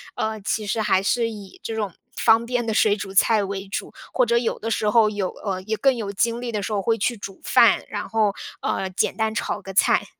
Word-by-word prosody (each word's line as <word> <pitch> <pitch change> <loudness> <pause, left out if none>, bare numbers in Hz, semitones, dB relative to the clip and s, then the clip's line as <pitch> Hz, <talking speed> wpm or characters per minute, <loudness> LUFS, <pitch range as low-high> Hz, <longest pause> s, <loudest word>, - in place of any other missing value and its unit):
呃， 220 0 -2
其 215 +1 -2
实 220 +2 -1
还 190 -3 +2
是 230 +3 +1
以 205 -4 -10
这 225 - -4
种 210 -3 -2 0.2
方 225 +1 +4
便 245 0 -1
的 225 - -1
水 210 -1 +4
煮 195 -1 -6
菜 210 +2 +4
为 195 0 -5
主， 195 - -5 0.2
或 255 - +3
者 235 0 +2
有 235 -1 0
的 225 - -3
时 210 -1 +1
候， 220 -1 +5
有， 205 -3 -2
呃 190 -3 -2
也 215 +3 -2
更 270 +2 +3
有 215 -4 -4
精 230 +4 0
力 245 -1 -3
的 210 -2 -2
时 - - -4
候 200 - 0
会 225 +3 +1
去 240 +3 0
煮 195 -1 -9
饭， - - +5
然 - - -4
后 215 -3 +2 0.3
呃， 190 - -1
简 185 - 0
单 220 -1 0
炒 - - -2
个 195 - -8
菜。 190 - +3
215 Hz, 260 characters per minute, -23 LUFS, 200-230 Hz, 0.3 s, 候